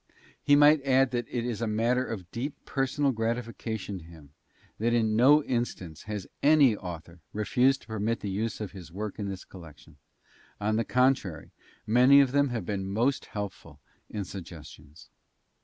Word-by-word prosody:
He 145 - +4
might 145 0 +6
add 135 -1 +3
that 120 -1 -2
it 120 -1 -2
is 120 -3 -3
a 115 - 0
matter 115 +4 +1
of 95 -8 -7
deep 135 +5 -4
personal 135 +1 0
gratification 115 -3 -3
to - - -14
him 80 -4 -15 0.5
that 120 +2 +1
in 110 -2 +1
no 145 +6 +6
instance 115 - -4
has 105 -3 -4 0.2
any 145 -6 +5
author 85 -3 -9
refused 125 +6 +2
to - - -21
permit 110 +1 -2
the 100 - -3
use 110 +3 -2
of 105 -4 -5
his 90 -4 -11
work 105 +3 -5
in 100 -1 -3
this 95 -1 -7
collection. 80 -6 -14 0.6
On 105 +1 0
the 115 - 0
contrary, 125 - +1 0.3
many 125 +5 +6
of 135 -3 +4
them 140 0 +2
have 115 -6 -3
been 95 -1 -3
most 120 +7 0
helpful 105 -2 -7 0.3
in 105 -2 -4
suggestions. 80 -5 -11
110 Hz, 170 wpm, -28 LUFS, 95-125 Hz, 0.6 s, might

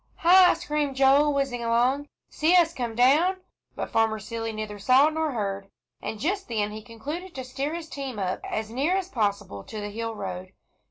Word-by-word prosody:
"Hi!" 360 +1 +6
screamed 300 -4 -2
Joel, 275 +2 +5
whizzing 275 -4 -1
along. 245 +5 +1 0.2
"See 320 +4 +2
us 335 -2 +4
come 240 -5 -4
down," 300 +10 +4 0.4
but - - -5
Farmer 225 -1 +2
Seeley 225 +2 -5
neither 215 -1 -6
saw 260 +8 +5
nor 315 -2 -1
heard, 200 -3 -3 0.3
and 220 - -5
just 385 - -1
then 210 -3 -1
he 215 +1 -7
concluded 290 - -7
to 260 - -5
steer 275 +5 -3
his 335 -1 -6
team 270 -6 -6
up 185 -2 -2
as 220 0 -4
near 290 +10 +1
as 380 -1 -3
possible 200 - -2
to 215 - -7
the 205 0 -5
hill 225 +1 -4
road. 185 -2 -6
255 Hz, 185 wpm, -26 LUFS, 220-300 Hz, 0.4 s, Hi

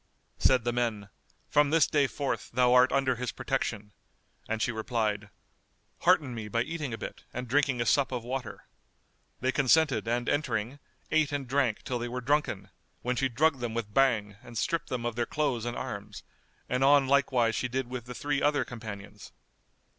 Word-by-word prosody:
'" - - -43
Said 130 -3 +4
the 120 0 0
men, 115 -4 -1 0.4
"From 145 -1 +3
this 160 0 +5
day 145 -2 +2
forth, 135 +4 -3
thou 125 0 +4
art 125 0 +6
under 130 -3 +1
his 125 0 -3
protection"; 115 -6 -3 0.6
and 115 0 -1
she 120 - +1
replied, 110 -2 -2 0.7
"Hearten 170 -8 +3
me 110 -2 -5
by 115 +2 0
eating 155 -2 -4
a 115 - -4
bit - - -7
and 125 0 -4
drinking 135 0 +2
a 120 - +1
sup 135 +4 +3
of 125 -3 -3
water."[FN#210] 125 -3 -5 0.8
They 130 +1 +2
consented 145 -1 +3
and 120 +1 0
entering, 130 -2 -1 0.3
ate 155 -2 +3
and 140 -2 -3
drank 130 -4 +1
till 125 -1 -2
they 120 - -3
were 125 +1 -3
drunken, 145 +5 -1 0.3
when 125 +1 0
she 135 +2 +1
drugged 140 +3 +2
them 120 -2 -3
with 110 -3 -4
Bhang 110 -6 +2
and 120 -1 -10
stripped 165 +8 -1
them 120 -2 -3
of 120 -2 -2
their 120 -1 -1
clothes 140 -7 -1
and 120 0 -3
arms; - - -6 0.4
and 125 +1 0
on 140 0 +5
like 140 +1 +3
wise 120 -3 +2
she 115 +3 -1
did 130 +1 -2
with 125 -2 -6
the 125 0 -8
three 145 +1 -1
other 145 0 +2
companions. 110 -4 -9
125 Hz, 190 wpm, -29 LUFS, 115-140 Hz, 0.8 s, art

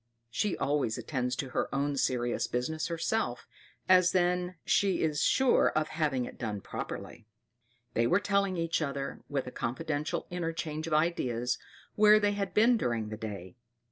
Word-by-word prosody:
She 205 - 0
always 140 -5 0
attends 125 +1 -2
to 135 - -4
her - - -1
own 140 +1 0
serious 120 -3 0
business 155 +6 -2
herself, 165 - -1 0.4
as 185 -1 +5
then 180 0 +1
she 195 -4 +2
is 155 -1 0
sure 265 -2 +4
of 155 0 +1
having 150 -6 0
it - - -10
done 105 -3 -3
properly. 105 - -7 0.7
They 115 +1 +2
were 180 - +4
telling 200 -2 +1
each 165 0 0
other, 140 -2 -3
with 140 -2 -1
a 125 - -7
confidential 140 +6 -2
interchange 165 -2 -3
of 165 - -2
ideas, 125 -7 0 0.3
where 210 0 +6
they 205 -1 +2
had 200 -2 -2
been 230 +3 +5
during 115 - -1
the 110 - -5
day. 105 -1 -7
155 Hz, 160 wpm, -30 LUFS, 125-180 Hz, 0.7 s, where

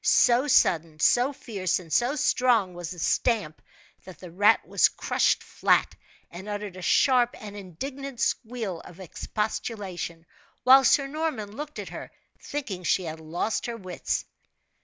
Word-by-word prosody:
So 245 +4 +4
sudden, 165 - +3
so 245 - +4
fierce, 200 - -2
and 170 -4 -8
so 245 +4 +2
strong, 240 -9 +2
was 175 -1 -6
the 180 - -8
stamp, 180 -2 0 0.4
that 185 - -12
the 180 -2 -11
rat 205 +5 +3
was - - +4
crushed - - 0
flat, - - +1 0.4
and 190 +4 -9
uttered 205 -2 -5
a 185 - -9
sharp 245 +4 +3
and 205 -1 -9
indignant 255 - -7
squeal 225 -8 -2
of 175 +2 -14
expostulation, 190 -3 -4 0.4
while 265 +2 +8
Sir 275 +1 +4
Norman 275 -8 -4
looked 300 +2 -7
at - - -6
her, - - -8 0.3
thinking 215 -11 -5
she 185 - +1
had 160 -1 -6
lost 170 +10 -2
her 235 -1 -4
wits. 185 -4 -3
205 Hz, 150 wpm, -26 LUFS, 180-250 Hz, 0.4 s, while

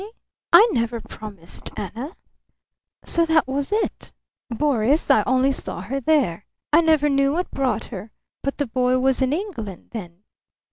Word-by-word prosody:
"I? 415 +2 -9 0.4
I 450 +3 +9
never 235 - -1
promised 200 -7 -8
Anna!... 235 - -6 0.9
So 335 - +2
that 320 -3 +3
was 275 +4 -2
it? 435 +1 -2 0.4
Boris, 275 +3 +2
I - - +5
only 260 +2 +3
saw 215 -9 -3
her 250 +9 -3
there. 250 - +1 0.3
I 325 - +7
never 315 -3 +3
knew 275 0 +2
what 355 +3 -2
brought 265 -2 -1
her. 200 +2 -7 0.3
But 275 - -3
the 285 - 0
boy 250 +1 +1
was 265 +1 +1
in 260 0 +2
England 295 - -5
then." 185 -4 -8
265 Hz, 155 wpm, -23 LUFS, 225-300 Hz, 0.9 s, I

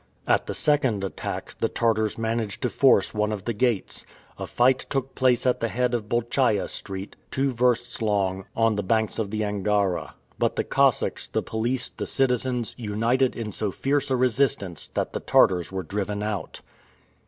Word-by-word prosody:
At - - +2
the - - -3
second 135 -9 +2
attack, 95 - -5
the - - +1
Tartars 110 -2 +1
managed 115 -2 -2
to 125 - 0
force 130 -8 +4
one 105 0 0
of 105 -3 -5
the 120 - -1
gates. 115 -2 -1 0.4
A - - -4
fight 130 +2 +2
took 135 -1 -2
place 125 -2 +2
at 125 - +2
the 115 - 0
head 125 +1 0
of 110 -3 -2
Bolchaia 120 -2 +1
Street, 95 0 -6
two 135 0 0
versts 120 -1 0
long, 95 -3 0
on 115 -2 +2
the - - +1
banks 110 +3 0
of 105 -3 -1
the 110 +1 -2
Angara. 100 -2 0 0.2
But - - +1
the - - 0
Cossacks, - - +1
the - - -2
police, 120 +3 -1
the - - -6
citizens, 125 -2 0
united 115 +4 +1
in 110 -2 -4
so 105 +1 -2
fierce 140 +7 -1
a 130 - +2
resistance 125 - 0
that - - -1
the - - -2
Tartars 90 -2 +3
were 95 -1 -3
driven 100 +3 -3
out. 105 -5 -4
115 Hz, 175 wpm, -25 LUFS, 105-125 Hz, 0.4 s, force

